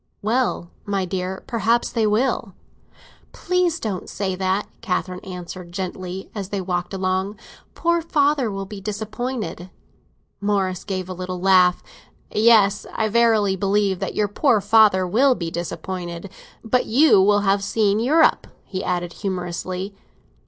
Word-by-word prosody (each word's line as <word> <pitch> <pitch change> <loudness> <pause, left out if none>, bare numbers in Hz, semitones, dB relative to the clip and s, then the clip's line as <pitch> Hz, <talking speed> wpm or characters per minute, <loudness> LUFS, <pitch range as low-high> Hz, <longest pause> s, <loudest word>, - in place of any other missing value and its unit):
"Well, 220 -6 0
my 200 -2 -1
dear, 185 +1 -4
perhaps 230 +1 +1
they 225 -2 +1
will!" 220 -2 0 0.8
"Please 360 -2 0
don't 200 -5 -4
say 190 -2 -2
that," 190 +2 -1
Catherine 185 -3 -2
answered 180 -1 -8
gently, 185 0 -5
as 195 -3 -5
they 200 - -2
walked 180 -1 -2
along. 190 +2 -1 0.4
"Poor 340 0 +1
father 290 -6 +2
will 195 -1 -4
be 195 0 -9
disappointed." 215 -3 -4 0.7
Morris 195 -3 0
gave 185 -2 -3
a 185 - -5
little 185 0 -5
laugh. 180 -1 +4 0.5
"Yes, 215 -2 +4
I 220 -1 0
verily 220 -3 +3
believe 195 0 +1
that - - -4
your 210 - +1
poor 225 +3 +2
father 205 -2 +5
will 250 +8 +3
be 170 -5 -4
disappointed! 175 +1 -5 0.3
But 250 +2 +1
you 255 -3 +5
will 205 +1 +4
have 195 0 +2
seen 205 0 +1
Europe," 305 +8 +3 0.2
he 185 -1 -5
added 175 -1 -2
humorously. 185 0 -4
200 Hz, 140 wpm, -22 LUFS, 185-220 Hz, 0.8 s, father